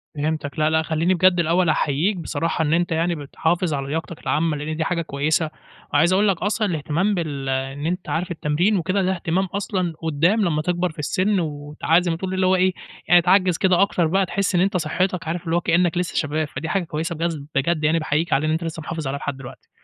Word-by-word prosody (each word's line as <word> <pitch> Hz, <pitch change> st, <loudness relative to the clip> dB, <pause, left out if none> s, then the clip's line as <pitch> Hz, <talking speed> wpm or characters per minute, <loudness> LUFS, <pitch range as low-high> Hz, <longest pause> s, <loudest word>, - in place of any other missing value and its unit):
فهمتك 150 Hz, 0 st, -3 dB
لا، 155 Hz, 0 st, +3 dB
لأ 160 Hz, 0 st, +2 dB
خلّيني 165 Hz, +3 st, +1 dB
بجد 180 Hz, 0 st, +4 dB
الأول 170 Hz, +1 st, +2 dB
أحيّيك 155 Hz, +7 st, +1 dB
بصراحة 165 Hz, 0 st, -2 dB
إن 150 Hz, +1 st, +1 dB
أنت 175 Hz, 0 st, +1 dB
يعني 165 Hz, +1 st, +1 dB
بتحافظ 160 Hz, +3 st, -1 dB
على 135 Hz, -1 st, -3 dB
لياقتك 160 Hz, +2 st, -4 dB
العامة 155 Hz, -1 st, 0 dB
لإن 155 Hz, +2 st, -4 dB
دي 160 Hz, -, 0 dB
حاجة 170 Hz, 0 st, -1 dB
كويسة 155 Hz, +2 st, 0 dB, 0.4 s
وعايز 165 Hz, +5 st, +4 dB
أقول 205 Hz, +2 st, +3 dB
لك 190 Hz, -3 st, +2 dB
أصلًا 210 Hz, +2 st, 0 dB
الإهتمام 165 Hz, +5 st, 0 dB
بال 145 Hz, -6 st, -3 dB
إن 135 Hz, +2 st, -2 dB
أنت 180 Hz, +1 st, -3 dB
عارف 175 Hz, +2 st, -2 dB
التمرين 170 Hz, +6 st, +1 dB
وكده، 185 Hz, +3 st, 0 dB
ده 185 Hz, -, +1 dB
اهتمام 180 Hz, +3 st, 0 dB
أصلًا 185 Hz, -2 st, -2 dB
قُدّام 165 Hz, +7 st, +2 dB
لما 155 Hz, -3 st, 0 dB
تكبر 175 Hz, +1 st, -1 dB
في 155 Hz, -, -15 dB
السِن 185 Hz, +6 st, +1 dB
وتع 150 Hz, +1 st, 0 dB
زي 175 Hz, -1 st, -1 dB
ما 165 Hz, -, -2 dB
تقول 190 Hz, +1 st, -4 dB
اللي 185 Hz, 0 st, +1 dB
هو 185 Hz, +1 st, +4 dB
إيه، 185 Hz, 0 st, +2 dB, 0.3 s
يعني 175 Hz, +1 st, +6 dB
تعجِّز 185 Hz, -1 st, +3 dB
كده 185 Hz, -1 st, +3 dB
أكتر 180 Hz, -4 st, +2 dB
بقى 190 Hz, +3 st, +2 dB
تحِس 195 Hz, 0 st, -1 dB
إن 175 Hz, -, +4 dB
أنت 195 Hz, -1 st, +2 dB
صحِّتك 180 Hz, +2 st, -1 dB
عارف 170 Hz, +1 st, -3 dB
اللي 165 Hz, +1 st, 0 dB
هو 175 Hz, -, +2 dB
كإنّك 175 Hz, 0 st, +2 dB
لسّه 180 Hz, -1 st, -2 dB
شباب، 155 Hz, 0 st, 0 dB
فدي 160 Hz, +2 st, -6 dB
حاجة 195 Hz, +1 st, 0 dB
كويسة 165 Hz, +1 st, -3 dB
بجد 165 Hz, -1 st, -2 dB, 0.2 s
بجد 155 Hz, +3 st, +1 dB
يعني 160 Hz, +2 st, +3 dB
باحييك 155 Hz, +1 st, 0 dB
عليه 150 Hz, +3 st, +2 dB
إن -, -, +1 dB
أنت 165 Hz, +2 st, -1 dB
لسّه 165 Hz, -1 st, -5 dB
محافظ 160 Hz, -2 st, -5 dB
عليها 140 Hz, +1 st, -3 dB
لحد 140 Hz, -2 st, -4 dB
دلوقتي. 135 Hz, -2 st, -12 dB
165 Hz, 225 wpm, -22 LUFS, 155-180 Hz, 0.4 s, يعني